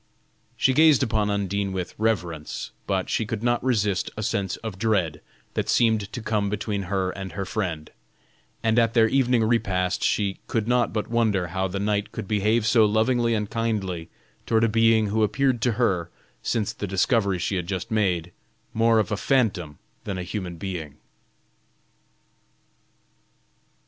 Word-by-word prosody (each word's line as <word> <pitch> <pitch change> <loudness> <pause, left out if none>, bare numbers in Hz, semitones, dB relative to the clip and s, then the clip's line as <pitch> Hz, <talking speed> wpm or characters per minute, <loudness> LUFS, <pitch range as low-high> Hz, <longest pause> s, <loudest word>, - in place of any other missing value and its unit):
She 130 - +3
gazed 155 -1 +5
upon 110 -4 0
Undine 100 -1 -1
with 90 -1 -4
reverence, 90 -8 -2 0.2
but 95 -2 0
she - - 0
could 110 -1 -4
not 120 0 +1
resist 105 -7 +1
a 110 - -3
sense 95 -2 -1
of 105 -4 -6
dread 100 -9 0 0.3
that - - -2
seemed 110 -3 +2
to 120 - -6
come 105 -2 0
between 105 0 -2
her 95 -2 0
and 95 -3 -7
her 100 +2 -3
friend, 90 -6 -3 0.7
and 115 +1 +3
at 115 0 +2
their 115 -1 +6
evening 125 -2 +2
repast 95 -5 0
she 100 -2 0
could 110 -2 -1
not 125 -1 +2
but 105 -1 -2
wonder 110 -7 +1
how 95 +2 -1
the 95 +1 -4
knight 105 0 -1
could 110 -3 -6
behave 105 +2 +1
so 110 0 +5
lovingly 115 +2 +2
and 105 -1 -3
kindly 100 -7 -2 0.4
toward 115 -1 +3
a - - +5
being 115 -1 +3
who 110 +2 +1
appeared 120 +3 +1
to 120 +1 +2
her, 95 -7 0 0.3
since 110 -2 -1
the 105 - -5
discovery 100 +1 +1
she 90 +3 -2
had 90 -2 -2
just 95 +4 -4
made, 90 -6 0 0.4
more 115 0 +3
of 105 -4 +1
a 105 - 0
phantom 95 - 0 0.3
than 100 -2 -3
a 90 - -3
human 90 -1 -5
being. 80 -6 -6
105 Hz, 165 wpm, -25 LUFS, 95-115 Hz, 0.7 s, their